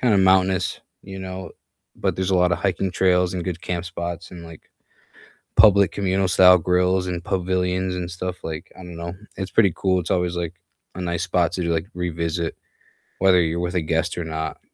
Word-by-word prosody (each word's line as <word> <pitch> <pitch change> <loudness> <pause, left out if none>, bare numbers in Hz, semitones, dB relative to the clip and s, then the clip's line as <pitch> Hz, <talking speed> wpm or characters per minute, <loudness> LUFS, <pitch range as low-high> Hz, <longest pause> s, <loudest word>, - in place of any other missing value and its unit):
kinda 115 -6 +3
mountainous, 95 -1 +3 0.2
you 95 0 -9
know. 95 0 -6 0.5
But - - -1
there's 95 0 -1
a - - +3
lot 90 0 +3
of - - 0
hiking 95 -1 0
trails 90 -1 +2
and 90 -2 -3
good 90 -2 -4
camp 90 -1 -3
spots 85 0 -5
and, 85 -2 -9
like, 80 -1 -12 0.9
public 100 -4 +6
communal 95 -1 0
style 90 0 +7
grills 90 +2 +1
and 85 -1 -4
pavilions 90 0 -1
and 90 -1 -4
stuff, 90 +1 -5
like, 80 0 -6
I - - -10
don't 90 -1 -9
know, 85 +1 -5 0.2
it's 95 -1 -4
pretty 100 -5 +4
cool. 95 -1 +1
It's 85 - -6
always, 90 -1 0
like, 85 -1 -3 0.4
a 90 - -7
nice 85 -1 -2
spot 85 -1 +1
to, 90 - -2
like, 80 +1 0
revisit 85 -1 -2 0.6
whether 95 -1 +5
you're 85 0 -1
with 90 0 -2
a 90 - +2
guest 80 +2 -1
or 85 - -3
not. 80 -2 -4
90 Hz, 195 wpm, -22 LUFS, 85-95 Hz, 0.9 s, style